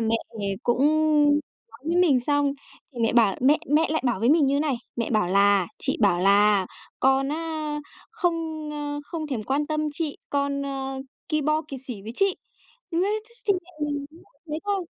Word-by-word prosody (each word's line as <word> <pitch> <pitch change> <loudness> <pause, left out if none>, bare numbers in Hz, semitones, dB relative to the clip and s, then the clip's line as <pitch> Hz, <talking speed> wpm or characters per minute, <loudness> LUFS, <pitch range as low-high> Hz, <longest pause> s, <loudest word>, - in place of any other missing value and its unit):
mẹ 225 0 +2 0.2
về 200 -1 -1
cũng 240 +1 +1 0.9
nói 230 - -15
với 335 +2 0
mình 280 -8 +4
xong, 285 +2 +1 0.4
thì 240 - -10
mẹ 225 - +2
bảo 225 -5 +4
mẹ 285 +4 +5
mẹ 315 +2 +4
lại 315 - 0
bảo 235 -6 0
với 235 +4 +4
mình 310 -2 +5
như 275 +1 +2
thế - - +1
này, 295 -4 +1 0.2
mẹ 235 -1 -2
bảo 215 -6 +2
là 200 -1 +4
"Chị - - -1
bảo 195 -5 +4
là 200 0 +4 0.3
con 270 +1 +3
á 310 -1 -3 0.3
không, 330 -7 -2
ơ, 290 0 -4
không 320 -1 -5
thèm 255 -7 -3
quan 280 +6 0
tâm 305 0 -1
chị, 310 -2 -3
con, 280 0 0
ơ, 270 -1 -4 0.3
ki 305 -1 0
bo 305 +2 +1
kiệt 270 -2 -7
sỉ 225 -6 -6
với 220 +3 -7
chị." 390 -1 +2 0.5
Nói 360 +5 +1
ch 470 +1 -21
chung 400 -3 +3
mẹ 360 - -18 0.2
mình 285 -1 -3
cũng 325 - -17 0.3
nói 300 - -8
hết - - -1
thôi, 400 -3 -1
285 Hz, 205 wpm, -25 LUFS, 235-315 Hz, 0.9 s, mẹ